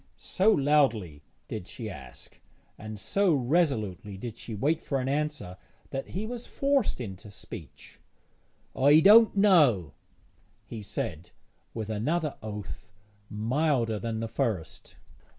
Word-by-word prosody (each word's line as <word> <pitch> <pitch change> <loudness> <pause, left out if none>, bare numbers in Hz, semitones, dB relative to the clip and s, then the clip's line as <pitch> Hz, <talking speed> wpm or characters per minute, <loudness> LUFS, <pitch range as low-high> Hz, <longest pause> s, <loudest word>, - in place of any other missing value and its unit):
So 195 +4 +1
loudly 135 - +2 0.3
did 90 - -6
she 115 -4 -7
ask, 65 -11 -11 0.3
and 110 -1 -8
so 195 - +2
resolutely 120 - 0
did 115 +2 -6
she 115 -1 -7
wait 150 +9 0
for 135 - -2
an 130 - -2
answer, 145 -10 -2 0.3
that 135 0 -4
he 200 +4 -4
was 240 +1 -6
forced 275 - 0
into 100 -3 -7
speech. 80 -7 -11 0.8
'I 145 +4 +6
don't 215 +3 +7
know,' 145 - +4 0.7
he 115 - -7
said, 85 -4 -5 0.5
with 110 -1 -4
another 150 +8 -1
oath, 105 +1 -7 0.4
milder 115 0 0
than 115 -1 -3
the 115 - -2
first. 105 -7 -3
120 Hz, 125 wpm, -28 LUFS, 105-155 Hz, 0.8 s, don't